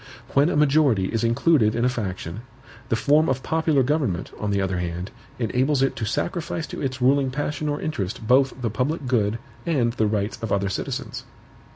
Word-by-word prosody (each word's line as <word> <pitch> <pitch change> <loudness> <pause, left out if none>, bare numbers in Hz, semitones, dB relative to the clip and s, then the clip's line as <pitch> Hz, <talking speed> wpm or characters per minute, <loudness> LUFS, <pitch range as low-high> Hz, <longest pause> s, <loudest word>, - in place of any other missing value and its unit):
When 140 +4 +4
a - - -1
majority 140 -9 +3
is 115 - 0
included 115 -1 +3
in 120 +1 +1
a - - +5
faction, 95 -5 -4 0.5
the - - +2
form 150 +7 +3
of 130 0 -1
popular 160 -4 +2
government, 130 - -1
on 105 - -2
the 100 -1 +1
other 95 -2 -1
hand, 90 +2 -4 0.3
enables 130 +4 +1
it 135 - +1
to 110 - -2
sacrifice 165 - -2
to - - -5
its 130 -2 -2
ruling 135 +1 +4
passion 150 +3 -2
or 145 - -1
interest 110 - -3
both 130 +2 +3
the 120 -4 -2
public 140 +6 -1
good 115 -4 +1 0.3
and 130 -9 +1
the 110 -2 +1
rights 105 0 -2
of 115 -3 -4
other 100 -1 +1
citizens. - - -4
125 Hz, 190 wpm, -24 LUFS, 105-145 Hz, 0.5 s, a